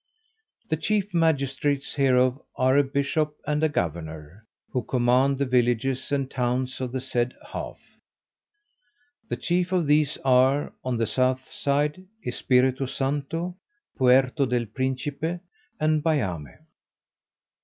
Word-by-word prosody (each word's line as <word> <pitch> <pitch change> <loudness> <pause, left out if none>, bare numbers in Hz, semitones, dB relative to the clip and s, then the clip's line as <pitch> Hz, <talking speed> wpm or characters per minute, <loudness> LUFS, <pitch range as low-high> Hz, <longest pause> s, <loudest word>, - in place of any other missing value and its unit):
The 160 - +1
chief 205 +4 -1
magistrates 145 -4 +1
hereof 130 -1 +3
are 130 +1 +3
a 145 - +5
bishop 145 +2 -1
and 150 +1 0
a 160 - +4
governor, 80 - -4 0.2
who 125 - 0
command 125 +3 +2
the 140 - 0
villages 125 +1 +1
and 140 -2 0
towns 130 0 -2
of 125 -2 -3
the 130 - -2
said 125 -1 -1 0.2
half. - - -6 1.5
The - - -2
chief 180 +1 0
of 180 -3 +2
these 150 0 +2
are, 130 +2 +3
on 130 -2 -1
the 115 - +1
south 130 +2 0
side, 150 +5 0 0.2
Espiritu 130 +1 +2
Santo, 145 +7 -2 0.4
Puerto 130 +2 +4
del 125 -1 0
Principe, 135 +8 -3 0.4
and 155 0 +2
Bayame. 95 - -2
135 Hz, 120 wpm, -25 LUFS, 125-150 Hz, 1.5 s, a